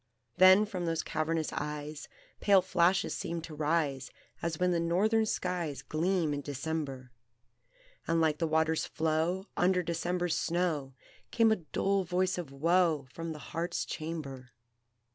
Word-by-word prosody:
Then 185 +3 +7
from 185 -5 -4
those 165 -1 0
cavernous 155 0 -1
eyes 150 0 -5 0.3
Pale 195 -3 +5
flashes 180 +1 +2
seemed 170 -3 -4
to 165 - -8
rise, 150 -3 0 0.3
As 165 -1 -2
when 180 0 +2
the 170 - +1
Northern 210 +7 +2
skies 175 -8 -2
Gleam 165 -1 0
in 145 - -3
December; 140 -2 -4 1.0
And, 165 0 +2
like 155 -2 +2
the 165 - +1
water's 160 0 +1
flow 160 +4 0
Under 180 0 +2
December's 175 +1 -1
snow, 165 -6 -1 0.3
Came 230 -1 +4
a 220 - +3
dull 195 +4 0
voice 180 +1 0
of 160 -6 -6
woe 165 0 +2
From 165 0 -5
the 155 - -6 0.2
heart's 170 +1 -2
chamber. 140 -7 -6
165 Hz, 145 wpm, -31 LUFS, 155-180 Hz, 1.0 s, Then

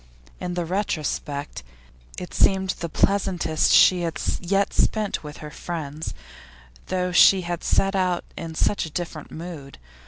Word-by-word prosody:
In 180 0 -4
the 175 -1 -1
retrospect 155 -6 -3 0.6
it 180 - -7
seemed 190 -1 +3
the 170 - -5
pleasantest 180 -3 +1
she 180 -1 +6
had 165 -1 -3 0.2
yet 195 +3 +1
spent 215 -5 0
with 150 0 -8
her 150 - -8
friends, 155 -3 -5 0.7
though 180 -1 -1
she 185 +2 +7
had 175 -1 -4
set 195 0 +2
out 180 -2 0
in 165 -1 -6
such 200 +1 +1
a - - -8
different 165 -1 -5
mood. 160 -4 -8
175 Hz, 145 wpm, -24 LUFS, 160-190 Hz, 0.7 s, she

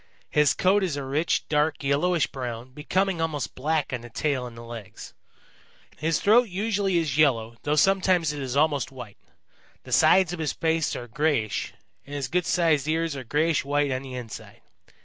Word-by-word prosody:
His 150 -1 +3
coat 195 +3 +3
is 175 -6 -1
a 140 - -3
rich, 145 +5 0
dark, 150 -1 0
yellowish 150 +4 +2
brown, 125 -1 -6
becoming 175 +5 -1
almost 155 -4 -2
black 150 +1 -1
on 125 - -3
the 120 - -11
tail 130 +1 -1
and 115 -1 -12
legs. 115 -3 -9 0.8
His 160 +1 0
throat 230 +3 +4
usually 195 -1 0
is 155 -4 -1
yellow, 115 -6 +2
though 150 +1 0
sometimes 185 -3 +3
it 145 - -5
is 135 0 -3
almost 145 -4 +1
white. 125 -6 -10 0.6
The - - -12
sides 185 -2 +5
of 175 - -6
his 155 -2 -1
face 160 -2 0
are 120 - -6
grayish, 130 -4 -1 0.3
and 145 - -9
his 135 -3 -3
good 180 -1 0
sized 160 -5 +2
ears 160 -1 0
are 135 - -6
grayish 150 +6 +1
white 145 0 0
on 130 0 -2
the 130 -2 -8
inside. 120 -4 -9
150 Hz, 180 wpm, -25 LUFS, 130-165 Hz, 0.8 s, sides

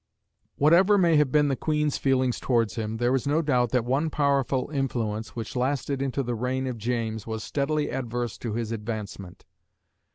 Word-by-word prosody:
Whatever 180 +8 +5
may 170 -4 +4
have 150 -3 +3
been 150 -1 +4
the 135 - +1
Queen's 150 0 0
feelings 130 -2 +1
towards 115 -4 +1
him, 110 0 -3
there 120 +2 +1
is 135 +1 0
no 155 +3 +2
doubt 125 -5 +2
that 125 -1 +1
one 140 +6 +1
powerful 140 -3 +1
influence, 115 -6 -2
which 115 0 -5
lasted 135 +2 -1
into 135 0 -1
the 120 -1 -2
reign 125 +3 -2
of 125 -3 -4
James, 110 -2 -2
was 110 -1 -4
steadily 150 +1 -1
adverse 120 -2 -3
to 115 -3 -4
his 115 0 -3
advancement. 105 -4 -6
125 Hz, 175 wpm, -26 LUFS, 115-140 Hz, -, Whatever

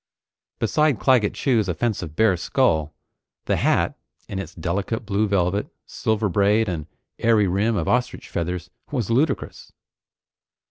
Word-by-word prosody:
Beside 150 +3 +2
Claggett 125 -6 +3
Chew's 115 -8 +1
offensive 90 -3 -2
bare 110 -1 +4
skull, 80 - +1 0.5
the - - +1
hat, - - +1 0.3
in 95 - -4
its 95 - -7
delicate 100 +7 -2
blue 105 +1 +1
velvet, 100 0 +1 0.2
silver 110 -1 -1
braid, 105 +3 +2
and 80 -5 -3 0.3
airy 110 -3 +4
rim 100 +5 +1
of 85 -6 -1
ostrich 125 0 0
feathers, 90 +1 -4 0.2
was 120 -7 -2
ludicrous. 135 +4 -1
105 Hz, 130 wpm, -23 LUFS, 90-115 Hz, 0.5 s, bare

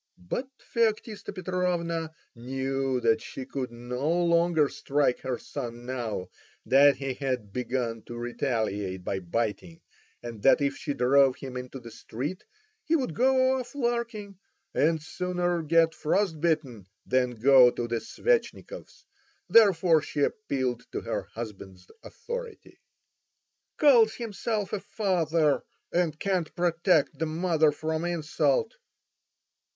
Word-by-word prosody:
But 90 - -4 0.3
Feoktista 220 -3 0
Petrovna 175 -3 -2 0.2
knew 135 +1 -2
that 115 -1 +3
she 130 - -7
could 130 -3 -4
no 125 +4 -3
longer 170 -2 +3
strike 140 -2 0
her 130 -2 -3
son 120 -3 -7
now 115 -7 -4 0.4
that 140 +1 +6
he 135 -1 -3
had 125 -6 -3
begun 120 -2 -2
to 120 - -7
retaliate 110 -6 -2
by 95 +1 -2
biting, 115 - -3 0.4
and 115 -3 -7
that 135 - +5
if 140 -1 0
she 145 -6 -4
drove 135 +1 +4
him 130 -2 -8
into 125 +1 -6
the 120 -2 -11
street 140 +14 -6 0.4
he 325 - +1
would 260 - -1
go 260 +3 +3
off 250 +2 -8
larking, 235 -6 -2 0.3
and 160 +1 +2
sooner 175 0 -1
get 165 +1 +3
frost 165 0 0
bitten 145 - -1 0.2
than 125 -1 +1
go 130 0 +7
to 120 0 -4
the 115 -1 -1
Svetchnikovs, - - -2 0.4
therefore 180 -7 +5
she 145 - -4
appealed 135 - -1
to - - -2
her - - -3
husband's 100 -5 -8
authority. 480 -1 -8 1.0
"Calls 240 -7 +5
himself 215 -2 -3
a 210 - 0
father, 165 -8 +1 0.3
and 170 -3 0
can't 185 -5 -1
protect 170 -3 +2
the 160 - 0
mother 160 -1 +2
from 160 +2 -3
insult!" 175 - 0
155 Hz, 125 wpm, -27 LUFS, 125-180 Hz, 1.0 s, go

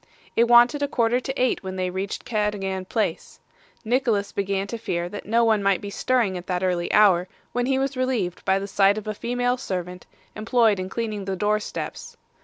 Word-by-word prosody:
It 235 +1 +4
wanted 240 +4 +6
a 285 - +1
quarter 240 -2 +1
to 265 +2 -5
eight 255 -1 +1
when 190 -1 -6
they 185 -1 -2
reached 190 +2 -4
Cadogan 205 -4 -2
Place. 205 -4 -3 0.5
Nicholas 225 -4 +1
began 195 0 -1
to 230 +3 -6
fear 175 -6 -2
that 200 +2 -8
no 230 +2 +3
one 220 -2 +3
might 195 -2 +2
be 205 - -7
stirring 225 -6 0
at 175 - -13
that 180 0 -1
early 180 -2 0
hour, 190 -4 +5 0.2
when 245 0 -1
he 265 0 +2
was 270 +1 -1
relieved 245 -9 -1
by 190 - +2
the 195 - -3
sight 200 +1 +3
of 215 - -5
a 215 - -3
female 245 +3 -1
servant, 180 -6 -5 0.3
employed 220 -2 +2
in 185 0 -4
cleaning 215 -2 -3
the 195 0 -2
door 210 +2 +1
steps. 210 - -7
210 Hz, 205 wpm, -24 LUFS, 190-240 Hz, 0.5 s, wanted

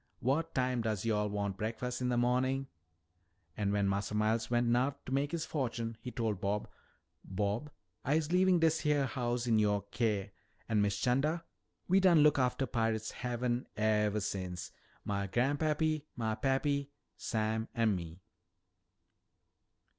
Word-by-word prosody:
W'at 135 +6 0
time 125 -2 +1
does 110 -2 -2
yo'all 105 -2 +1
wan' 100 -1 -1
breakfas' 115 +5 -3
in 125 - +1
de 120 - +1
mornin'?' 130 +2 +1 0.9
An' 100 -1 0
wen 100 -1 +2
Massa 100 +2 -1
Miles 110 +2 +1
wen' 120 0 +2
no'th 130 +3 +2
to - - -7
mak' 140 +2 +1
his 165 -1 -2
fo'tune, 115 -5 -2
he 125 - -5
told 110 -5 -2
Bob, 100 +1 -1 0.6
'Bob, 105 +8 -2 0.3
I'se 155 +3 +1
leavin' 185 0 +4
dis 160 -1 +3
heah 150 -3 +2
hous' 120 -1 -2
in 115 -2 +3
youah 105 -1 +2
keer.' 105 -4 0 0.4
An', 110 -2 +2
Miss 100 -1 +1
'Chanda, 150 - +1 0.4
we 190 +2 +5
done 175 -5 +6
look 150 -2 +5
aftah 130 +1 +1
Pirate's 110 -2 -1
Haven 125 0 -2
evah 105 -1 +2
since, 90 -4 -4 0.3
mah 100 -1 -1
gran'pappy, 150 +6 +1
mah 110 -3 -1
pappy, 140 +4 0 0.3
Sam 110 0 -1
an' 115 -4 +3
me." 85 +1 -7
120 Hz, 145 wpm, -33 LUFS, 105-135 Hz, 0.9 s, done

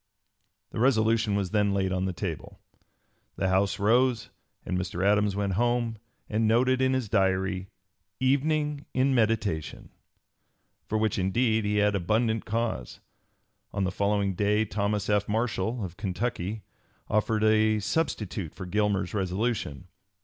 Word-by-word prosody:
'" - - -50
The - - -5
resolution 115 -3 +3
was 100 -3 -1
then 105 -2 +2
laid 95 -1 0
on 95 0 0
the 95 - -1
table. 85 - -6 0.8
The 95 - 0
House 95 +1 +2
rose, 120 +3 +2 0.3
and - - -2
Mr. 90 0 -2
Adams 105 -1 +3
went 100 -1 -1
home 120 +1 0 0.3
and 110 +1 +1
noted 130 +3 +3
in 130 0 +3
his 130 -4 -1
Diary, 95 -2 +1 0.5
"evening 145 +2 +1
in 130 +1 +3
meditation," 110 -9 -1 1.0
for 110 - 0
which 110 -2 0
indeed 110 +3 +1
he 105 0 0
had 105 0 +3
abundant 110 +4 0
cause. 110 - -3 0.7
On 100 - 0
the 95 - 0
following 100 0 0
day 105 +3 +1
Thomas 105 0 -1
F. 105 -1 +1
Marshall, 110 0 -1
of 90 -1 -9
Kentucky, 100 +1 -3 0.4
offered 110 0 +1
a 110 0 +4
substitute 105 - -2
for 95 - -7
Gilmer's 100 -1 0
resolution. 95 - -2
105 Hz, 140 wpm, -27 LUFS, 95-115 Hz, 1.0 s, a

